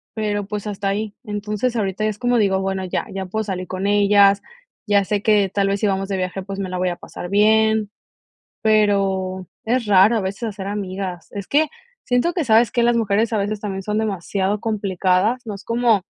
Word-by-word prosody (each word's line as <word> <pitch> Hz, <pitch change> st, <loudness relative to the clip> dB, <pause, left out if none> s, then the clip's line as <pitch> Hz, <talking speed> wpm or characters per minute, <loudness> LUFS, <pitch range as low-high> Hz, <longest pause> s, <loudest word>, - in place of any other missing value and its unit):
pero, 205 Hz, -2 st, -1 dB
pues, 210 Hz, 0 st, -5 dB
hasta 200 Hz, -1 st, -2 dB
ahí. 205 Hz, +1 st, -3 dB
Entonces, 210 Hz, +3 st, -2 dB
ahorita 195 Hz, -1 st, -1 dB
es 215 Hz, -1 st, -1 dB
como 245 Hz, -1 st, +2 dB
digo, 190 Hz, -2 st, +2 dB
bueno, 190 Hz, 0 st, -2 dB
ya, 185 Hz, -, -2 dB
ya 190 Hz, 0 st, -3 dB
puedo 215 Hz, +3 st, -3 dB
salir 185 Hz, -2 st, -4 dB
con 185 Hz, +2 st, -3 dB
ellas, 200 Hz, -1 st, +5 dB, 0.4 s
ya 200 Hz, -2 st, +3 dB
sé 205 Hz, +1 st, -1 dB
que 210 Hz, -3 st, +3 dB
tal 200 Hz, -1 st, +1 dB
vez 200 Hz, 0 st, 0 dB
si 210 Hz, -, +1 dB
vamos 195 Hz, 0 st, -1 dB
de 195 Hz, -, -1 dB
viaje, 185 Hz, +1 st, -3 dB
pues, 195 Hz, +1 st, -6 dB
me 195 Hz, -, -2 dB
la 185 Hz, -, -3 dB
voy 180 Hz, 0 st, 0 dB
a 175 Hz, -, -4 dB
pasar 175 Hz, -, -8 dB
bien, 220 Hz, +1 st, +3 dB, 0.7 s
pero 195 Hz, -4 st, +1 dB, 0.2 s
es 235 Hz, +1 st, +1 dB
raro 205 Hz, +3 st, +5 dB
a 215 Hz, -, 0 dB
veces 190 Hz, +4 st, -4 dB
hacer 205 Hz, -3 st, -4 dB
amigas, 190 Hz, -4 st, -5 dB
es 200 Hz, -2 st, -6 dB
que, 310 Hz, +2 st, +3 dB, 0.4 s
siento 245 Hz, +8 st, +1 dB
que, 340 Hz, -, 0 dB
¿sabes 230 Hz, -2 st, +4 dB
qué?, 240 Hz, -2 st, +1 dB
las 240 Hz, 0 st, +3 dB
mujeres 220 Hz, +1 st, +1 dB
a -, -, +2 dB
veces 205 Hz, +1 st, -2 dB
también 195 Hz, -2 st, -4 dB
son 210 Hz, +2 st, -2 dB
demasiado 200 Hz, -1 st, -1 dB
complicadas, 200 Hz, +1 st, 0 dB
no 210 Hz, -, -5 dB
es 195 Hz, -, -11 dB
como 230 Hz, -4 st, +2 dB
205 Hz, 210 wpm, -21 LUFS, 195-220 Hz, 0.7 s, ellas